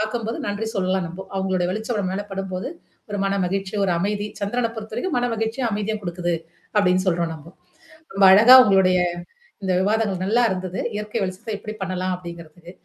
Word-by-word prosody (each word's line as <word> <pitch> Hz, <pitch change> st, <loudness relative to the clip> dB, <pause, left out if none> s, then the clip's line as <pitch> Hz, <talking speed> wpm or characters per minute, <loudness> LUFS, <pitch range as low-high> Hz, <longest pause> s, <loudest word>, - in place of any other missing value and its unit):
பார்க்கும்போது 225 Hz, +1 st, -2 dB
நன்றி 205 Hz, +2 st, -2 dB
சொல்லலாம் 190 Hz, -1 st, 0 dB
நம்போ. 175 Hz, +3 st, -7 dB
அவங்களளுடைய 190 Hz, -2 st, 0 dB
வெளிச்சம் 220 Hz, +4 st, -3 dB
நம்ம 185 Hz, -2 st, -2 dB
மேல 200 Hz, +2 st, -2 dB
படும்போது, 190 Hz, -1 st, -4 dB, 0.4 s
ஒரு 205 Hz, -, -3 dB
மன 195 Hz, 0 st, 0 dB
மகிழ்ச்சி, 195 Hz, +1 st, -2 dB
ஒரு 190 Hz, -, +1 dB
அமைதி, 205 Hz, +3 st, -1 dB
சந்திரனைப் 230 Hz, +3 st, -1 dB
பொறுத்தவரைக்கும் 220 Hz, +10 st, -4 dB
மன 245 Hz, -, +1 dB
மகி்ச்சியா 225 Hz, +3 st, -2 dB
அமைதியா 210 Hz, +1 st, -2 dB
கொடுக்குது. 175 Hz, -1 st, -2 dB, 0.4 s
அப்படின்னு 185 Hz, -3 st, +3 dB
சொல்றோம் 170 Hz, -2 st, +1 dB
நம்ப. 160 Hz, 0 st, -12 dB, 0.7 s
ரொம்ப 195 Hz, 0 st, +4 dB
அழகா 225 Hz, +6 st, +9 dB
உங்களுடைய. 190 Hz, -3 st, +4 dB, 0.7 s
இந்த 190 Hz, -, 0 dB
விவாதங்கள் 205 Hz, -2 st, 0 dB
நல்லா 230 Hz, +5 st, +3 dB
இருந்தது. 185 Hz, 0 st, -4 dB, 0.2 s
இயற்கை 210 Hz, +2 st, -4 dB
வெளிச்சத்த 185 Hz, +4 st, -5 dB
எப்படி 215 Hz, +1 st, -7 dB
பண்ணலாம் 185 Hz, -1 st, -2 dB
அப்படிங்கிறதுக்கு. 170 Hz, -1 st, -11 dB
195 Hz, 165 wpm, -22 LUFS, 185-215 Hz, 0.7 s, அழகா